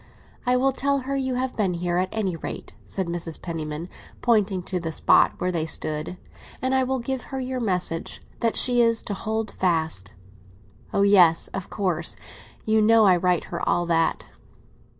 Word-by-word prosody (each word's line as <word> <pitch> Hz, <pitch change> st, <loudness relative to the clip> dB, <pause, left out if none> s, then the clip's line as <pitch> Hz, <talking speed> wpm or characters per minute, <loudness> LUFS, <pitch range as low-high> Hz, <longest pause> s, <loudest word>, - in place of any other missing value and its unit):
"I 250 Hz, 0 st, +4 dB
will 270 Hz, +2 st, +3 dB
tell 280 Hz, +1 st, 0 dB
her 275 Hz, +2 st, -3 dB
you 260 Hz, -2 st, -1 dB
have 255 Hz, 0 st, -2 dB
been 190 Hz, -5 st, 0 dB
here, 175 Hz, 0 st, -1 dB
at 185 Hz, +1 st, 0 dB
any 195 Hz, -5 st, -1 dB
rate," 165 Hz, -, -7 dB
said 190 Hz, -, -2 dB
Mrs. 170 Hz, -1 st, -4 dB
Penniman, 160 Hz, -1 st, -5 dB, 0.4 s
pointing 210 Hz, -6 st, +2 dB
to 180 Hz, 0 st, -3 dB
the 165 Hz, -1 st, -4 dB
spot -, -, +4 dB
where 180 Hz, -, -1 dB
they 165 Hz, -2 st, -1 dB
stood; 155 Hz, +2 st, -3 dB, 0.4 s
"and 260 Hz, +1 st, -1 dB
I 265 Hz, 0 st, +3 dB
will 265 Hz, +1 st, -1 dB
give 260 Hz, +1 st, -4 dB
her 270 Hz, -, -5 dB
your 255 Hz, 0 st, -3 dB
message—that 185 Hz, +2 st, -2 dB
she 245 Hz, -1 st, +4 dB
is 230 Hz, -1 st, +2 dB
to 205 Hz, -, -3 dB
hold 220 Hz, +2 st, -3 dB
fast!" 160 Hz, -, -1 dB, 0.8 s
"Oh, 200 Hz, -, +2 dB
yes! 180 Hz, -5 st, +5 dB
of 195 Hz, -2 st, -6 dB
course. 185 Hz, -6 st, -1 dB, 0.5 s
You 220 Hz, 0 st, +3 dB
know 220 Hz, 0 st, +5 dB
I 185 Hz, -2 st, +6 dB
write 180 Hz, -1 st, +1 dB
her -, -, -3 dB
all 175 Hz, 0 st, +2 dB
that." 165 Hz, -1 st, +1 dB
195 Hz, 175 wpm, -24 LUFS, 170-240 Hz, 0.8 s, I